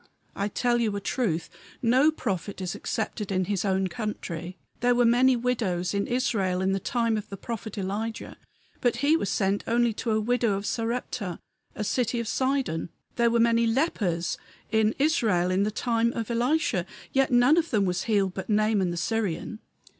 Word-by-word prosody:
I 200 - -1
tell 240 +3 +1
you 215 -3 0
a - - -1
truth; 195 -6 -1 0.3
no 255 +5 +4
prophet 200 - -3
is 185 -2 -3
accepted 215 -2 -3
in 185 -1 +1
his 200 -1 -1
own 190 -1 +1
country. 180 -3 -5 0.2
There 245 +1 +3
were 245 0 +4
many 250 +2 +5
widows 225 -8 -1
in 200 0 0
Israel 220 -7 0
in 190 +1 +1
the 195 - 0
time 230 -1 0
of 210 - -6
the 195 - -7
prophet 220 0 -6
Elijah, 205 +4 -4 0.4
but 245 -2 +1
he 305 +3 +5
was 205 - -1
sent 195 0 0
only 235 0 +2
to 230 - -4
a 215 0 +2
widow 235 -1 +1
of 200 +1 -4
Sarepta, 230 -6 -2 0.4
a 215 - -3
city 235 +2 0
of 235 - -3
Sidon. 260 - 0 0.3
There 235 -1 +3
were 235 0 +2
many 230 0 +4
lepers 205 - 0 0.3
in 220 0 +2
Israel 220 - +2
in 185 +1 +2
the 205 - +2
time 230 +1 0
of 230 0 -3
Elisha, 280 +8 +1 0.3
yet 270 0 +3
none 245 +5 +5
of 335 -1 +1
them 210 -4 +2
was 180 -1 -1
healed 200 -4 +1
but 190 - -6
Naaman 210 -3 +2
the 175 - -3
Syrian." 215 +2 -2
220 Hz, 185 wpm, -27 LUFS, 195-240 Hz, 0.4 s, many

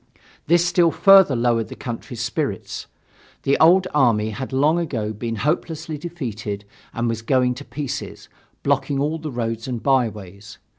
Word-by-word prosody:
This 170 +2 +4
still 175 -1 +3
further 195 -4 +6
lowered 115 -2 +1
the - - -9
country's 120 0 -6
spirits. 110 - -3 0.6
The 140 - +3
old 180 +3 +6
army 115 -7 +3
had 130 +4 -6
long 150 +6 +2
ago 115 -10 -2
been 115 +2 -4
hopelessly 155 +4 -2
defeated 110 -11 -5 0.3
and 115 +1 -2
was 115 -1 -2
going 125 +1 +2
to 140 +3 -10
pieces, 140 +2 -6 0.4
blocking 140 -1 0
all 150 +3 -1
the 155 -1 -5
roads 115 -1 -3
and 120 -3 -4
byways. 105 -7 -1
130 Hz, 150 wpm, -22 LUFS, 115-155 Hz, 0.6 s, further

